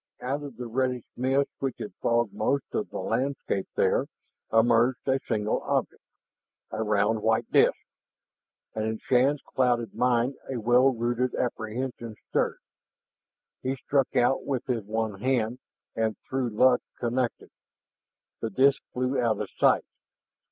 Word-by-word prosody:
Out 135 +4 -2
of 140 -5 -8
the 125 - -5
reddish 125 +1 -1
mist 135 +2 +1
which 135 -1 -2
had - - -6
fogged 120 -2 +1
most 135 +6 0
of - - -1
the - - -6
landscape 130 -7 -1
there - - +2 0.4
emerged 120 +3 +3
a 135 0 +3
single 105 -2 0
object, - - -1 0.7
a 110 - -3
round 105 +1 +1
white 110 +1 +1
disk. - - +5 1.0
And 110 - -2
in 110 0 -1
Shann's 135 +5 +2
clouded 120 -3 +1
mind 125 +1 +1
a 130 - -2
well 120 +4 +5
rooted 120 +1 -1
apprehension 120 0 -3
stirred. - - +1 1.0
He 130 +1 -1
struck 135 0 0
out 125 +1 +3
with 130 -4 -2
his 120 -4 -1
one 110 -1 -2
hand, 125 -1 0 0.4
and 110 -1 0
through 130 -2 -1
luck 125 +3 +4 0.2
connected. 120 0 -2 0.9
The 115 - -2
disk 135 +6 +3
flew 125 +2 0
out 115 -4 +1
of - - -4
sight. - - +3
120 Hz, 140 wpm, -27 LUFS, 110-130 Hz, 1.0 s, disk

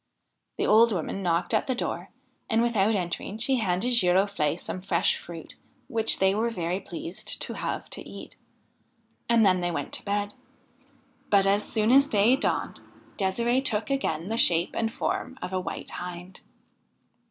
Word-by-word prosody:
The - - 0
old 225 +2 +6
woman 195 +1 -3
knocked 175 +3 0
at 220 - +1
the 260 - 0
door, - - -3 0.4
and, 225 0 +3
without 220 -2 +2
entering, 180 +2 -3
she 255 +4 +2
handed 205 +2 0
Giroflee 185 -6 +3
some 185 - -5
fresh 185 -2 +1
fruit 165 -2 -10 0.3
which 225 -1 +2
they 190 0 +3
were 225 +3 0
very 180 -4 -2
pleased 175 -1 -5
to - - -5
have - - -4
to - - -3
eat; - - -10 0.9
and 230 -2 +5
then 185 -2 +3
they 175 - 0
went 170 - -4
to - - -3
bed. 205 0 -2 1.0
But, 200 -1 +4
as 200 +2 +3
soon 220 +1 +2
as 275 +2 +6
day 215 +3 +4
dawned, - - -2 0.4
De'sire'e 235 +7 +1
took 225 0 -1
again 170 - -1
the 225 - -1
shape 170 -5 +3
and 225 -1 0
form 260 +3 -3
of 180 +1 -6
a 185 - +1
White 185 - -6
Hind. 180 +1 -8
200 Hz, 165 wpm, -26 LUFS, 180-230 Hz, 1.0 s, old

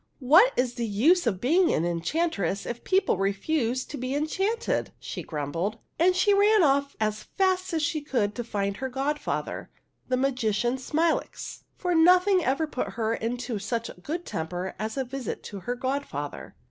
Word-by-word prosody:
''What 320 - +7
is 250 -1 +1
the 235 -2 -2
use 270 - +3
of 190 -5 0
being 335 - +3
an 165 - +1
enchantress 195 - -1
if 235 0 -5
people 380 - +2
refuse 235 +6 0
to 290 - -7
be 255 +2 -2
enchanted? 390 +10 -1
" - - -39
she - - -4
grumbled; 165 +8 -3 0.2
and 360 +2 +4
she 405 +3 +4
ran 410 0 +5
off 280 -1 +2
as 215 0 0 0.2
fast 375 -1 +2
as 320 -2 0
she 310 -1 0
could 235 -8 0
to 240 - -4
find 200 -3 -2
her 265 0 -3
godfather, 275 +3 -3 0.4
the 255 - +2
magician 250 -2 0
Smilax, 315 +5 -1
for 360 -1 -1
nothing 360 +3 +5
ever 275 +3 +1
put 295 -4 -4
her 225 -1 0
into 235 0 -3
such 230 +3 -3
a - - -8
good 315 - -5
temper 175 +3 -4
as 220 +4 -3
a 265 - +1
visit 260 -1 -5
to 200 - -7
her 245 +6 -3
godfather. 255 - -4
255 Hz, 175 wpm, -27 LUFS, 215-325 Hz, 0.4 s, What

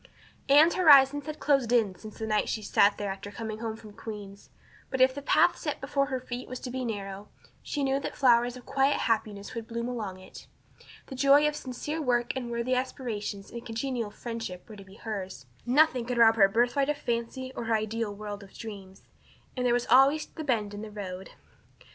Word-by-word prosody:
Anne's 305 +4 +7
horizons 290 -4 +6
had 305 0 -5
closed 275 -5 +2
in 225 -6 +3
since 215 +3 -12
the 220 - -4
night 215 -1 0
she 220 - -2
had 205 - -8
sat 200 0 +4
there 205 -1 -3
after 195 +1 -7
coming 215 +1 -6
home 225 -1 -4
from 215 -1 -13
Queen's; 205 -2 -9 0.4
but 265 - -3
if 260 0 +5
the 285 - -6
path 340 +5 +4
set 295 -3 -4
before 275 0 0
her 260 -2 -2
feet 250 0 -6
was 255 0 -6
to 250 - -6
be 260 0 -3
narrow 200 -3 -5 0.3
she 290 - -3
knew 270 0 +1
that - - -5
flowers 245 -2 +3
of 245 - -13
quiet 275 +1 +1
happiness 215 -3 -1
would 230 -2 -6
bloom 235 0 -3
along 215 -7 -4
it. 185 - -13 0.6
The - - -9
joy 280 +3 +5
of 300 - -1
sincere 295 +3 -5
work 240 -3 0
and 250 -2 -4
worthy 235 +2 -1
aspiration 235 -6 -3
and 235 0 -6
congenial 230 -1 -3
friendship 225 -5 -7
were 215 - -10
to 200 - -11
be 190 0 -16
hers; 190 - -6 0.2
nothing 260 -2 +3
could 245 0 -3
rob 225 -1 +6
her 205 -3 +6
of - - 0
her 230 - +4
birthright 275 +3 +1
of 295 - 0
fancy 250 +1 -3
or 235 - -4
her 225 0 +2
ideal 220 0 -2
world 205 0 -7
of 195 -1 -14
dreams. 195 -4 -9 0.5
And 250 -1 0
there - - +3
was 245 0 +1
always 275 +5 +5
the 315 - -8
bend 220 -7 -1
in 205 - -6
the 220 - -7
road! 190 -3 -7
235 Hz, 215 wpm, -28 LUFS, 210-265 Hz, 0.6 s, Anne's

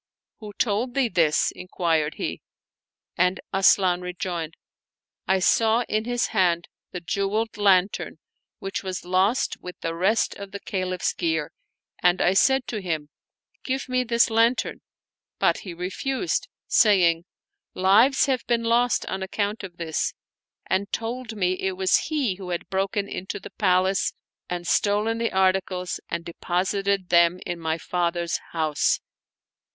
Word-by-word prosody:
"Who 210 -3 -9
told 230 +4 -1
thee 270 -4 +2
this?" 160 -6 +2
inquired 165 -4 -1
he, - - -4 0.8
and 180 +1 +2
Asian 190 -2 +4
rejoined, 175 -2 -4 0.4
" - - -59
I 190 - +3
saw 225 +5 +3
in 215 +1 -1
his 245 0 0
hand 175 -5 +1 0.2
the 180 - -6
jeweled 200 +5 -1
lantern 195 -2 +2 0.4
which 195 0 -4
was 185 -2 -5
lost 190 +7 +1
with 180 0 -9
the 165 - -2
rest 195 +7 +1
of 200 -1 -9
the 200 - -5
Caliph's 185 -2 -2
gear, 160 -3 -1 0.5
and 180 +1 +3
1 180 - +3
said 265 +6 +3
to 215 -3 -3
him: 160 -5 -3 0.5
Give 265 0 -2
me 255 0 +1
this 235 -1 +2
lantern! 230 +3 +2 0.6
but - - +2
he 185 - -8
refused, 260 - -2 0.2
saying: 175 -6 +4 0.5
Lives 215 +9 +5
have 260 -3 0
been 235 -1 +1
lost 235 +1 +2
on 190 - -4
account 205 +2 -2
of 175 -3 -9
this, 160 -2 -2 0.5
and 200 +2 -1
told 230 0 -4
me 185 -3 +1
it 190 -1 -2
was 190 -1 +2
he 270 - 0
who 190 -2 -8
had 175 -1 -3
broken 195 +1 -1
into 195 +2 -5
the - - -11
palace 185 +1 +2 0.4
and 175 -1 -4
stolen 210 +5 +1
the 230 - 0
articles 185 -1 0
and 170 0 -3
deposited 190 +2 -1
them 170 +1 +4
in 175 -1 -4
my 160 0 -1
father's 170 0 -1
house." 155 -3 +1
190 Hz, 145 wpm, -24 LUFS, 175-220 Hz, 0.8 s, Lives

